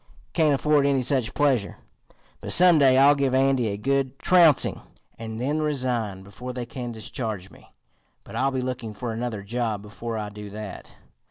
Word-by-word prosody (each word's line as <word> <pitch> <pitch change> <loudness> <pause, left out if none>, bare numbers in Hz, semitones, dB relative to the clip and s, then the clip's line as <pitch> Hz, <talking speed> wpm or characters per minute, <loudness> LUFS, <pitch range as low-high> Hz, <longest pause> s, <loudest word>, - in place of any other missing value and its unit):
Can't 155 -4 +3
afford 145 0 +2
any 135 -2 +1
such 125 -2 0
pleasure. 135 -8 +1 0.6
But - - -3
some 175 -2 +6
day 130 -2 +5
I'll 140 +2 +7
give 140 -2 0
Andy 135 -3 +2
a 100 -1 -3
good 135 +3 -1
trouncing, 170 -5 +4 0.4
and 110 0 -6
then 145 +5 -1
resign 125 -10 -2
before 125 +6 -8
they 125 -1 -5
can 120 0 -6
discharge 110 -3 -5
me. - - -19 0.5
But - - -11
I'll 135 - +1
be 130 -1 -2
looking 125 -4 -5
for 120 -1 -4
another 115 -3 -4
job 110 -1 -3
before 110 +2 -6
I 105 -1 -4
do 105 0 -9
that. 105 -1 -8
125 Hz, 175 wpm, -24 LUFS, 110-140 Hz, 0.6 s, I'll